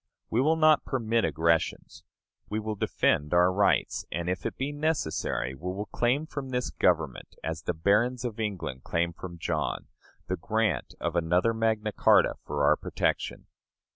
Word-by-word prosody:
We 115 Hz, -, +3 dB
will 155 Hz, +4 st, +3 dB
not 155 Hz, -1 st, +5 dB
permit 115 Hz, -3 st, 0 dB
aggressions. 80 Hz, 0 st, 0 dB, 0.5 s
We 105 Hz, -, -1 dB
will 110 Hz, 0 st, -3 dB
defend 75 Hz, -5 st, +1 dB
our 90 Hz, +1 st, +5 dB
rights; 100 Hz, +1 st, +2 dB
and, 85 Hz, +1 st, -2 dB
if 90 Hz, -, -2 dB
it -, -, -7 dB
be 135 Hz, +2 st, -2 dB
necessary, 145 Hz, -, -1 dB
we 90 Hz, +7 st, -5 dB
will 100 Hz, +3 st, -4 dB
claim 130 Hz, +6 st, +1 dB
from 140 Hz, -4 st, -6 dB
this 125 Hz, -1 st, -2 dB
Government, -, -, 0 dB
as 80 Hz, 0 st, -3 dB
the 90 Hz, -, -2 dB
barons 115 Hz, +9 st, +2 dB
of 115 Hz, -2 st, -4 dB
England 90 Hz, -12 st, -3 dB
claimed 85 Hz, 0 st, -1 dB
from 85 Hz, -2 st, -8 dB
John, 80 Hz, -, -2 dB, 0.4 s
the -, -, -2 dB
grant -, -, -1 dB
of 85 Hz, 0 st, -2 dB
another 90 Hz, +6 st, +2 dB
Magna 110 Hz, -1 st, 0 dB
Charta -, -, +4 dB
for -, -, -2 dB
our -, -, +5 dB
protection. -, -, -2 dB
105 Hz, 165 wpm, -28 LUFS, 85-125 Hz, 0.5 s, not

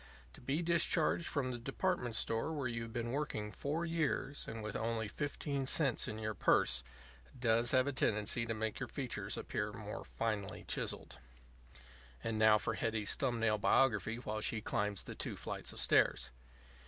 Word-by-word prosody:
To -, -, -12 dB
be 140 Hz, +7 st, -1 dB
discharged 170 Hz, 0 st, +3 dB
from 130 Hz, -4 st, -1 dB
the 120 Hz, -, -4 dB
department 135 Hz, -1 st, -1 dB
store 115 Hz, +7 st, 0 dB
where 140 Hz, -4 st, -1 dB
you 115 Hz, -1 st, -3 dB
have 115 Hz, 0 st, -6 dB
been 120 Hz, 0 st, -2 dB
working 120 Hz, -7 st, -2 dB
four 150 Hz, -, -2 dB
years, 155 Hz, -4 st, -1 dB
and 115 Hz, -1 st, -5 dB
with 105 Hz, -1 st, -4 dB
only 115 Hz, -1 st, -1 dB
fifteen 140 Hz, +2 st, -3 dB
cents 135 Hz, -3 st, +3 dB
in 110 Hz, -, -4 dB
your 110 Hz, 0 st, -2 dB
purse, 65 Hz, -9 st, +3 dB, 0.6 s
does 115 Hz, -1 st, +3 dB
have 130 Hz, 0 st, +4 dB
a 140 Hz, -, 0 dB
tendency 110 Hz, 0 st, +2 dB
to 115 Hz, -, -1 dB
make 110 Hz, 0 st, -2 dB
your -, -, -4 dB
features -, -, -3 dB
appear -, -, -2 dB
more -, -, -6 dB
finely 105 Hz, -4 st, -3 dB
chiselled. -, -, -2 dB, 1.0 s
And 110 Hz, -1 st, -1 dB
now 110 Hz, 0 st, +7 dB
for 110 Hz, -, -2 dB
Hetty's 110 Hz, -2 st, 0 dB
thumb 125 Hz, -4 st, 0 dB
nail 110 Hz, -2 st, +2 dB
biography 115 Hz, -2 st, +3 dB
while 110 Hz, -3 st, -4 dB
she 110 Hz, -, +1 dB
climbs 105 Hz, -1 st, -1 dB
the -, -, -7 dB
two -, -, -3 dB
flights -, -, -4 dB
of -, -, -6 dB
stairs. -, -, +3 dB
115 Hz, 175 wpm, -35 LUFS, 110-135 Hz, 1.0 s, now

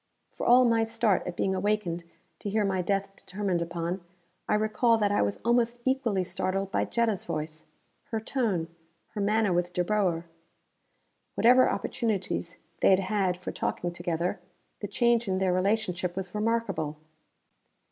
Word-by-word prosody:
For -, -, -4 dB
all 250 Hz, +1 st, +7 dB
my 230 Hz, -1 st, +3 dB
start 225 Hz, -4 st, +1 dB
at 175 Hz, -, -4 dB
being 190 Hz, -, 0 dB
awakened 185 Hz, -3 st, -1 dB, 0.3 s
to 205 Hz, -, -4 dB
hear 210 Hz, +1 st, +1 dB
my 190 Hz, -2 st, 0 dB
death 195 Hz, +2 st, -1 dB
determined 190 Hz, -3 st, -2 dB
upon, 170 Hz, +2 st, -3 dB, 0.5 s
I -, -, +4 dB
recall 215 Hz, +2 st, +3 dB
that 205 Hz, -2 st, +1 dB
I 205 Hz, -, +2 dB
was 100 Hz, 0 st, 0 dB
almost 235 Hz, 0 st, +2 dB
equally 245 Hz, -8 st, +1 dB
startled 190 Hz, +2 st, -2 dB
by -, -, +1 dB
Jetta's 225 Hz, -5 st, 0 dB
voice. 155 Hz, 0 st, -5 dB, 0.4 s
Her 225 Hz, -, -3 dB
tone, 215 Hz, -8 st, -1 dB, 0.4 s
her 210 Hz, -, -5 dB
manner 210 Hz, -1 st, +2 dB
with 175 Hz, 0 st, 0 dB
De 180 Hz, -, +1 dB
Boer. 180 Hz, -4 st, 0 dB, 1.1 s
Whatever 250 Hz, +2 st, +6 dB
opportunities 195 Hz, -7 st, -2 dB, 0.2 s
they -, -, +4 dB
had 190 Hz, -, +6 dB
had 190 Hz, -2 st, 0 dB
for 180 Hz, -, -5 dB
talking 175 Hz, -, -2 dB
together, 175 Hz, 0 st, -2 dB, 0.4 s
the 205 Hz, -, -4 dB
change 235 Hz, +2 st, +2 dB
in 190 Hz, -1 st, 0 dB
their 190 Hz, -1 st, +1 dB
relationship 185 Hz, -2 st, 0 dB
was 185 Hz, -1 st, -5 dB
remarkable. 210 Hz, -9 st, -1 dB
195 Hz, 155 wpm, -28 LUFS, 180-225 Hz, 1.1 s, all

